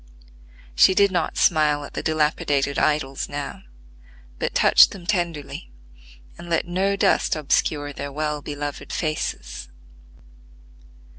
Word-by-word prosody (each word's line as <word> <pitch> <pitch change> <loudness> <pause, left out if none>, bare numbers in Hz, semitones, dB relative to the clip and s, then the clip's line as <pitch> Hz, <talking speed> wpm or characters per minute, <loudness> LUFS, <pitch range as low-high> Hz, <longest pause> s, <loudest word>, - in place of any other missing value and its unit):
She 125 - +5
did 200 0 +4
not 175 -3 -1
smile 150 -3 +2
at - - -12
the - - -3
dilapidated 150 -2 0
idols 135 -3 0
now, 145 0 -6 0.8
but - - -3
touched - - +6
them 185 -3 -11
tenderly, 170 - -3 0.7
and 170 - -10
let 165 - +1
no 190 +3 0
dust 200 -3 +2
obscure 145 -1 0
their 140 0 -6
well 150 0 -3
beloved 145 0 -6
faces. 65 - -4
150 Hz, 120 wpm, -23 LUFS, 145-170 Hz, 0.8 s, touched